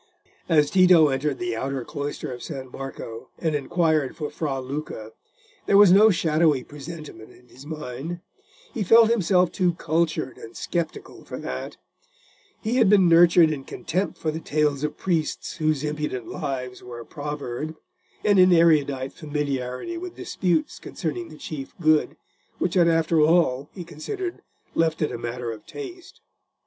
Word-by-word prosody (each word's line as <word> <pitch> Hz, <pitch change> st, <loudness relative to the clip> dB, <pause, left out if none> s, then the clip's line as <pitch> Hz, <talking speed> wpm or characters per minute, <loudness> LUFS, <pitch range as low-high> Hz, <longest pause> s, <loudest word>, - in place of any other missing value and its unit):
As 150 Hz, -3 st, +4 dB
Tito 180 Hz, -5 st, +6 dB
entered 135 Hz, +1 st, -1 dB
the 120 Hz, -1 st, -2 dB
outer 135 Hz, +1 st, -3 dB
cloister 145 Hz, -1 st, -5 dB
of 120 Hz, -, -9 dB
San 135 Hz, -4 st, -7 dB
Marco, 125 Hz, -4 st, -8 dB
and 160 Hz, -2 st, -1 dB
inquired 155 Hz, -1 st, +1 dB
for 150 Hz, -3 st, -4 dB
Fra 150 Hz, -3 st, -2 dB
Luca, 130 Hz, -5 st, -6 dB, 0.6 s
there 200 Hz, -, +5 dB
was 205 Hz, -3 st, +8 dB
no 210 Hz, +4 st, +7 dB
shadowy 160 Hz, -6 st, +2 dB
presentiment 150 Hz, -5 st, -10 dB
in 125 Hz, -, -20 dB
his 135 Hz, +4 st, -14 dB
mind: 155 Hz, +2 st, -6 dB, 0.5 s
he 235 Hz, -, -3 dB
felt 225 Hz, +3 st, +6 dB
himself 185 Hz, -5 st, +3 dB
too 180 Hz, -3 st, +1 dB
cultured 160 Hz, -4 st, -1 dB
and 115 Hz, -, -11 dB
sceptical 170 Hz, -2 st, -4 dB
for -, -, -7 dB
that: -, -, -6 dB, 0.9 s
he 235 Hz, +3 st, 0 dB
had 220 Hz, -, +5 dB
been 195 Hz, -3 st, +6 dB
nurtured 170 Hz, -1 st, +6 dB
in 140 Hz, -3 st, -4 dB
contempt 180 Hz, +7 st, -3 dB
for 155 Hz, -, -2 dB
the 160 Hz, -, -4 dB
tales 150 Hz, -3 st, 0 dB
of 150 Hz, 0 st, -2 dB
priests 170 Hz, 0 st, -2 dB
whose 155 Hz, -3 st, 0 dB
impudent 150 Hz, -5 st, -3 dB
lives 130 Hz, -4 st, -4 dB
were 120 Hz, -1 st, -9 dB
a 115 Hz, -, -9 dB
proverb, 150 Hz, 0 st, -5 dB, 0.5 s
and 205 Hz, -2 st, +5 dB
in 185 Hz, 0 st, +7 dB
erudite 145 Hz, -6 st, +3 dB
familiarity 145 Hz, -, -3 dB
with 360 Hz, 0 st, -7 dB
disputes 175 Hz, -4 st, -1 dB
concerning 170 Hz, 0 st, -5 dB
the 155 Hz, -, -12 dB
Chief 140 Hz, -4 st, -7 dB
Good, 155 Hz, -2 st, +2 dB, 0.4 s
which 175 Hz, -, -1 dB
had 175 Hz, -3 st, +4 dB
after 165 Hz, -1 st, +3 dB
all, 150 Hz, -4 st, +3 dB
he 180 Hz, -, -6 dB
considered, 350 Hz, -, -6 dB, 0.3 s
left 160 Hz, -1 st, +1 dB
it 150 Hz, -, 0 dB
a -, -, -4 dB
matter 120 Hz, 0 st, -4 dB
of 110 Hz, -2 st, -10 dB
taste. 365 Hz, -4 st, -9 dB
155 Hz, 160 wpm, -24 LUFS, 135-175 Hz, 0.9 s, was